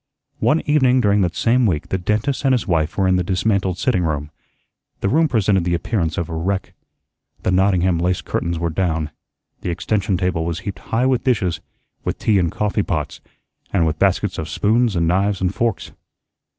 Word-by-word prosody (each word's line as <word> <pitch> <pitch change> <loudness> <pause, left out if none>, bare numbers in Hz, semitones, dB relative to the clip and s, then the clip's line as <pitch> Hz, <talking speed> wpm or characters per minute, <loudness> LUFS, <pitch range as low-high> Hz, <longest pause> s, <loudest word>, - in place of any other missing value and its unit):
One 155 +2 +2
evening 130 -4 +3
during 105 -3 +3
that 90 -2 0
same 120 +1 +3
week 80 -6 -2
the 95 - -1
dentist 105 +10 -1
and 135 -2 +4
his 120 - -2
wife 80 -3 0
were 95 -2 +2
in 95 0 +3
the 90 - 0
dismantled 95 0 0
sitting 95 -4 +1
room. 75 -2 -2 0.7
The 100 - +1
room 160 +6 +3
presented 100 - +2
the 85 0 +1
appearance 85 -2 -1
of 85 - -1
a - - -7
wreck. 95 +4 -2 0.7
The - - +1
Nottingham 90 -2 +2
lace 90 +1 0
curtains 85 0 -2
were 85 0 -1
down. 80 -3 -1 0.5
The - - -3
extension 95 +2 0
table 90 -3 0
was 85 0 -3
heaped 100 -2 -6
high 115 +3 +1
with 130 -3 +1
dishes, 100 -10 +1 0.4
with - - -2
tea 105 -3 +2
and 85 -3 +1
coffee 105 0 0
pots, 75 -6 -3 0.5
and 90 -4 +2
with 80 -1 -1
baskets 100 0 +1
of 80 0 -4
spoons 110 +5 +1
and 85 -1 +1
knives 95 +3 +1
and 95 0 0
forks. 115 -2 -2
95 Hz, 190 wpm, -20 LUFS, 85-110 Hz, 0.7 s, and